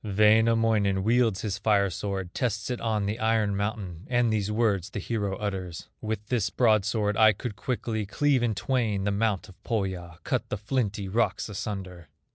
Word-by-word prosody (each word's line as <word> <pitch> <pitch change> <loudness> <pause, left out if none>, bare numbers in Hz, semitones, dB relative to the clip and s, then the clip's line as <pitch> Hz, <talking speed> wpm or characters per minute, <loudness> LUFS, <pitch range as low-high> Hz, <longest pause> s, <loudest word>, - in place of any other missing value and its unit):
Wainamoinen 110 -1 +3
wields 115 -2 +2
his 100 -2 -3
fire 100 -2 +2
sword, 95 0 -4
Tests 115 -2 -1
it 125 - -3
on 110 -3 0
the 105 +3 -2
iron 110 -2 +2
mountain, 100 -4 -4
And 120 -2 +2
these 105 -1 0
words 105 -4 +1
the - - -7
hero 100 -1 -2
utters: 95 -5 -5
"With 110 -1 -3
this 115 -3 0
broadsword 110 -2 +2
I 110 -1 +7
could 105 +2 -6
quickly 110 -1 -2
Cleave 140 +4 +2
in 115 -3 +1
twain 110 -4 0
the 105 - +1
mount 105 -1 0
of 95 - -17
Pohya, 95 -7 -3
Cut - - -1
the - - -2
flinty 105 -2 -2
rocks 110 +3 0
asunder." 95 -4 -5
105 Hz, 170 wpm, -27 LUFS, 100-115 Hz, -, I